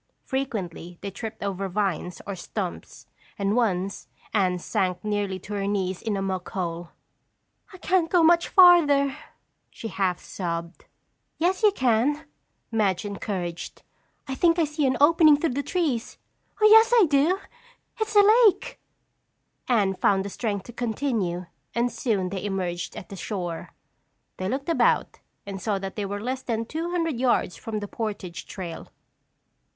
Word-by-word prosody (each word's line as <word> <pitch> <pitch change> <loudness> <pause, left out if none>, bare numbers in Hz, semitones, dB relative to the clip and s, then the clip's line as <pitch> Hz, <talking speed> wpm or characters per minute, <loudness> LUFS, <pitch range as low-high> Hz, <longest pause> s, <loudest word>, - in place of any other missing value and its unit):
Frequently, 195 - -4
they 200 - -5
tripped 220 +2 -7
over 195 -1 -2
vines 180 -3 -2
or 200 - -4
stumps 185 +1 -6 0.3
and 200 +1 0
once 195 -5 0 0.3
Anne 185 -4 +2
sank 180 0 -1
nearly 205 -2 -1
to 190 +3 -9
her 200 -1 -2
knees 190 -2 -1
in 215 -3 -2
a 195 - -2
muck 185 -2 -3
hole. 170 -2 -4 0.8
"I 375 - -11
can't 365 -2 +1
go 350 -2 +4
much 340 +1 +5
farther," 295 -7 +6 0.5
she 225 - -7
half 185 -3 0
sobbed. 170 -2 -5 0.5
"Yes, 360 +3 +1
you 425 -2 +6
can," 260 - +1 0.5
Madge 210 -3 +1
encouraged. 190 -4 -5 0.4
"I 270 - -3
think 335 +5 +3
I 335 - +3
see 300 -2 0
an 260 -1 +1
opening 310 0 +6
through 320 0 0
the 280 - -1
trees. 290 -8 -2 0.4
Yes, 440 +2 +7
I 450 -5 +7
do! 300 +6 +3 0.6
It's 435 -1 -2
the 410 -1 +8 0.2
lake!" 400 - -1 0.9
Anne 210 -6 +2
found 190 +1 +2
the - - -4
strength 205 -2 -3
to 240 - -11
continue 220 -7 -2 0.3
and 240 +1 +1
soon 200 -7 -1
they 190 0 -5
emerged 185 -3 -3
at - - -9
the 195 - -7
shore. 175 -3 -5 0.6
They 185 0 -2
looked 275 +2 -3
about 335 - +2 0.3
and 195 -1 -6
saw 210 -1 0
that 195 0 -6
they 205 -2 -3
were 205 +1 -4
less 255 +4 -3
than 230 -3 -2
two 320 +7 -4
hundred 330 -7 -1
yards 240 -8 +1
from 215 -2 -5
the 205 - -5
portage 200 -6 -5
trail. 175 -4 -7
210 Hz, 155 wpm, -25 LUFS, 190-285 Hz, 0.9 s, the